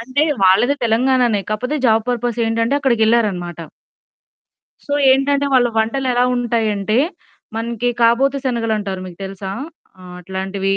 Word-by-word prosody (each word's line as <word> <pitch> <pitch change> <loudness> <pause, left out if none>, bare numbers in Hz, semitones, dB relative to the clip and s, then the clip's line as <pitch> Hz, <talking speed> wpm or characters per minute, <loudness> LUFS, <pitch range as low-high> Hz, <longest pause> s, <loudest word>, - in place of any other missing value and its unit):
అంటే, 260 +5 -1 0.2
వాళ్ళది 195 +9 +4
తెలంగాణానే 240 -1 +2
కాకపోతే 250 +8 -2
జాబ్ 220 -1 +3
పర్పసేంటంటే 235 0 0
అక్కడికెళ్ళారన్నమాట. 220 - +1 1.3
సో 285 - -4 0.2
ఏంటంటే, 280 +1 +2
వాళ్ళ 245 -2 +4
వంటలెలావుంటాయంటే, 235 -3 0 0.6
మనకి 235 +1 -2
కాబోతీ 265 +4 +3
శనగలంటారు 220 -6 -2
మీకు 175 -2 -11
తెలుసా? 190 0 -7 0.5
ఆహ్, 180 -1 -11
అట్లాంటివి 190 +1 -3
230 Hz, 100 wpm, -18 LUFS, 205-250 Hz, 1.3 s, వాళ్ళది